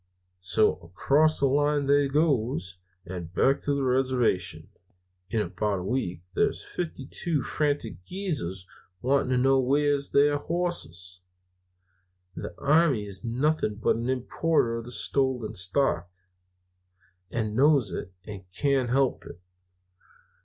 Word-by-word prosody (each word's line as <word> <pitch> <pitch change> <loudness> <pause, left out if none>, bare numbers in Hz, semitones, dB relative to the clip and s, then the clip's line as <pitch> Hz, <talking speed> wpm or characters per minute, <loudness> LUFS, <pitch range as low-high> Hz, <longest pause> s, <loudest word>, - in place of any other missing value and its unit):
"So, 95 +4 +2
across 140 - +2
the 140 - +3
line 145 +1 +2
they 140 0 +3
goes, 125 - 0 0.3
and 85 -2 -7
back 135 +8 +2
to 145 - -1
the 140 - -1
reservation. 125 -11 0 0.6
In 110 - 0
about 100 +2 -1
a 90 - -5
week 90 -6 -2
there's - - +1
fifty 160 -6 -5
two 150 0 -2
frantic 145 - -1
Greasers 145 - -3 0.4
wanting 135 +1 +2
to 130 - +2
know 135 +1 +4
where's 140 +2 +2
their 145 +1 +3
hosses. 120 - -3 1.2
The - - -6
army 145 -7 +3
is 95 -2 -5
nothing 125 -1 0
but 110 - +1
an 115 +2 -3
importer 130 -1 0
of 115 +1 -7
stolen 130 -3 0
stock, 90 - 0 1.2
and 110 +1 -2
knows 140 -1 +4
it, 95 - -5
and 100 -3 -8
can't 135 0 +1
help 130 +1 +1
it. 85 - -11
130 Hz, 125 wpm, -27 LUFS, 100-145 Hz, 1.2 s, know